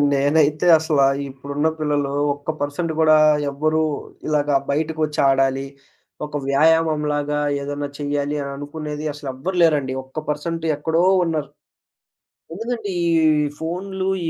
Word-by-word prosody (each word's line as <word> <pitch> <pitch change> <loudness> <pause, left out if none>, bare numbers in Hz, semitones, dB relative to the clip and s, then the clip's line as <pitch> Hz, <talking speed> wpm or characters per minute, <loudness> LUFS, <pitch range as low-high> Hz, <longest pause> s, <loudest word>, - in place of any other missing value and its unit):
నేనైతే 150 +3 +2
అసలా 150 -3 +2 0.2
ఇప్పుడున్న 140 +3 -2
పిల్లలు 145 -2 0 0.2
ఒక్క 145 +2 -5
పర్సెంట్ 150 +3 -2
గూడా 155 -1 +5 0.3
ఎవ్వరూ 155 +3 0 0.5
ఇలాగ 150 -1 0 0.2
బయటకొచ్చి 155 0 -1
ఆడాలి, 135 0 +2 0.6
ఒక 150 0 -4
వ్యాయామంలాగా 150 0 +2 0.2
ఏదన్నా 145 0 -4
చేయాలి, 145 0 -2
అననుకునేది 150 +2 -6
అసలు 145 -1 -8
ఎవ్వరు 180 +8 -4
లేరండి. 145 -5 +2
ఒక్క 130 +4 -9
పర్సెంట్ 165 +2 -3
ఎక్కడో 160 +3 0 0.2
ఉన్నారు. 155 -3 -2 1.1
ఎందుకంటే 225 +1 -4 0.2
ఈ - - +2 0.5
ఫోనులు, 185 +3 -3 0.2
ఈ - - +1
150 Hz, 115 wpm, -21 LUFS, 145-160 Hz, 1.1 s, గూడా